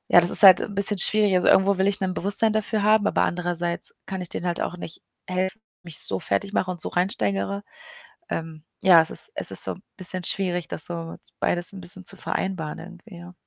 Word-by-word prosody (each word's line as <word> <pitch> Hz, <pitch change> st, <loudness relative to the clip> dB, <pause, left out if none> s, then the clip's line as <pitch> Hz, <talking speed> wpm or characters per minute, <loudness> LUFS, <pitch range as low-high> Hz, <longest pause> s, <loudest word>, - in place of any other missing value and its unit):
ja, 175 Hz, -, +7 dB
das 175 Hz, -, -1 dB
ist -, -, +6 dB
halt 185 Hz, -3 st, +9 dB
'n 205 Hz, -, -5 dB
bisschen 200 Hz, 0 st, +4 dB
schwierig. 210 Hz, 0 st, +3 dB
Also, 180 Hz, -, +2 dB
irgendwo 190 Hz, 0 st, +4 dB
will 190 Hz, -, +2 dB
ich 200 Hz, +1 st, 0 dB
'n 185 Hz, -1 st, -1 dB
Bewusstsein 205 Hz, +3 st, +2 dB
dafür 215 Hz, 0 st, -1 dB
haben, 215 Hz, 0 st, +3 dB
aber -, -, +1 dB
andererseits 175 Hz, -1 st, -2 dB
kann 190 Hz, -1 st, -5 dB
ich 180 Hz, -, -4 dB
denen 175 Hz, -, -4 dB
halt 175 Hz, -, -2 dB
auch 180 Hz, -, -3 dB
nicht 165 Hz, -2 st, -9 dB, 0.2 s
helfen, 190 Hz, +4 st, -3 dB, 0.2 s
mich 170 Hz, -4 st, -7 dB
so 95 Hz, -, 0 dB
fertig 100 Hz, -, -1 dB
mache 185 Hz, -3 st, -1 dB
und 175 Hz, -3 st, -6 dB
so -, -, -1 dB
reinsteigere. 175 Hz, -, -1 dB, 0.7 s
Ähm, 160 Hz, -1 st, -6 dB, 0.2 s
ja, 175 Hz, -3 st, +7 dB
es 160 Hz, -, -2 dB
ist 440 Hz, -, -2 dB
es -, -, 0 dB
ist -, -, +3 dB
so -, -, -2 dB, 0.2 s
bisschen 185 Hz, -1 st, -1 dB
schwierig, 180 Hz, -1 st, -2 dB
das 155 Hz, -, -1 dB
so 165 Hz, -1 st, -6 dB, 0.2 s
beides 175 Hz, +2 st, 0 dB
'n 190 Hz, -, -9 dB
bisschen 180 Hz, +1 st, -2 dB
zu -, -, -3 dB
vereinbaren 180 Hz, -7 st, -4 dB
irgendwie, 180 Hz, +2 st, -13 dB
ja. 175 Hz, +1 st, -12 dB
180 Hz, 220 wpm, -24 LUFS, 175-195 Hz, 0.7 s, halt